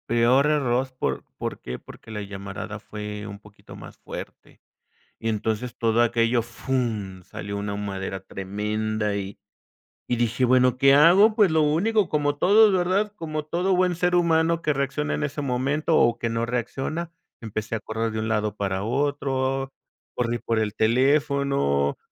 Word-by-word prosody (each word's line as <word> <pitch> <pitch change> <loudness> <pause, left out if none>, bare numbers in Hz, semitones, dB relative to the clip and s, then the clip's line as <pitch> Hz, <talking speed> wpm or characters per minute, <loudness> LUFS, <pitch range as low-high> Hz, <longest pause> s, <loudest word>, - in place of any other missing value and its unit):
Peor 120 +5 +4
error 130 -4 +1
por - - -2
¿por - - -4
qué? 60 0 -6
Porque - - -13
la 105 -1 -4
llamarada 100 +1 -7
fue 105 0 -7
un 100 0 -8
poquito 105 0 -15
más - - -11
fuerte, - - -10 0.6
y 115 - -3
entonces 110 +2 -2
todo 115 0 +2
aquello 120 0 +2
fum, 115 -5 -3
salió 100 +3 -7
una 100 0 -3
humareda 95 -1 -4
tremenda 105 +2 -3
y 100 0 -5 0.7
y 120 - +1
dije: 120 +2 0
"Bueno, 125 0 +4
¿qué 135 +1 +6
hago?" 185 +9 +6
Pues 205 -6 +4
lo 160 0 +3
único, 190 +8 +2
como 145 -1 +1
todos, 205 +5 +5
¿verdad? 190 +3 +1
Como 155 -5 -4
todo 180 +4 0
buen 180 -1 +2
ser 180 +1 +1
humano 165 -1 +2
que 150 - +2
reacciona 140 +2 -1
en - - -2
ese 145 0 -3
momento, 140 +4 0
o 115 0 +3
que 115 - -2
no 115 +1 -1
reacciona, 135 +8 -3 0.3
empecé 110 -1 -4
a - - -2
correr 110 +1 -3
de 110 - -3
un 110 - -2
lado 105 -2 -1
para 95 -2 -2
otro, 135 +1 -1 0.4
corrí 120 -1 -1
por 115 0 -1
el 105 -2 -1
teléfono, 130 - +2
120 Hz, 165 wpm, -24 LUFS, 105-150 Hz, 0.7 s, qué